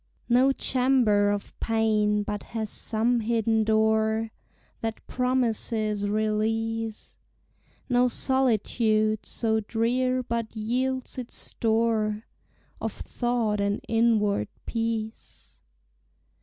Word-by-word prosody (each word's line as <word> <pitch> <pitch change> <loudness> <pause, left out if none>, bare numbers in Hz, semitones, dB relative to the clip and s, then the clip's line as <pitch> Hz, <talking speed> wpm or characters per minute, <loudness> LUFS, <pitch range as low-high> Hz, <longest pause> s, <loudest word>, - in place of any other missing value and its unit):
No 255 +3 +5
chamber 250 -7 +2
of 205 -1 -3
pain 215 -2 +1
but 205 0 -4 0.2
has 220 -2 -3
some 235 +2 +1
hidden 225 -1 +1
door 220 0 +2 0.5
That 225 -1 -4
promises 225 -4 0
release; 220 +1 -1 0.7
No 250 -1 +3
solitude 220 -4 +1
so 220 -1 0
drear 250 +4 0
but 235 -2 -3
yields 255 +4 -2
its 245 - -6
store 220 -1 0 0.6
Of - - -2
thought 235 -4 -1
and 200 0 0
inward 225 -3 +2 0.2
peace. 225 -1 -4
225 Hz, 90 wpm, -26 LUFS, 215-240 Hz, 0.7 s, No